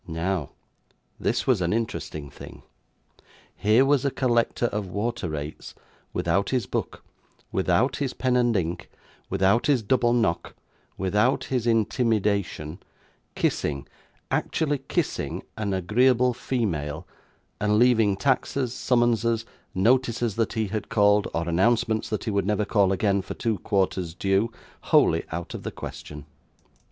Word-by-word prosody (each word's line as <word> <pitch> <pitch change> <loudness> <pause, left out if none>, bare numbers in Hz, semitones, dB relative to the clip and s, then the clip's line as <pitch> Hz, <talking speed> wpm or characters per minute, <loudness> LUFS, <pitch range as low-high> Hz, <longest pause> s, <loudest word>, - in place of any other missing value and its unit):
Now, 85 -1 -2 0.7
this - - 0
was 125 -8 +2
an 85 +2 +1
interesting 80 -10 -3
thing. - - -12 0.9
Here 110 +6 +4
was 140 -2 +3
a 140 - +2
collector 120 -2 +1
of 105 -4 -2
water 105 0 -2
rates, 75 0 -6 0.4
without 100 - 0
his 125 -5 0
book, - - -4 0.5
without - - +1
his 140 -3 -2
pen 130 -1 +1
and 120 -3 +3
ink, 85 -1 -3 0.4
without 100 +5 +2
his 135 -6 +3
double 120 +2 +2
knock, 115 -8 0 0.4
without 105 +7 +1
his 125 -3 -2
intimidation, 105 - 0 0.6
kissing 70 -1 -1 0.5
actually 145 -3 0
kissing 135 - -2
an 105 -2 -2
agreeable 125 +7 +3
female, 85 - -2 0.5
and 105 0 +2
leaving 115 -4 +4
taxes, 130 0 0
summonses, 115 -3 +1 0.3
notices 120 +1 +2
that 115 -1 0
he 110 -1 0
had 110 +1 -4
called, 105 -1 +4
or 85 0 -2
announcements 110 +5 +1
that 110 - -2
he 110 - -2
would 100 -2 0
never 105 0 +1
call 100 -2 +3
again, 100 0 +1
for - - -7
two 110 -4 -1
quarters' 95 -5 -1
due, 100 +4 +1 0.3
wholly - - +4
out 85 +1 -5
of - - -6
the - - -4
question. 75 -1 -8
105 Hz, 135 wpm, -25 LUFS, 95-120 Hz, 0.9 s, Here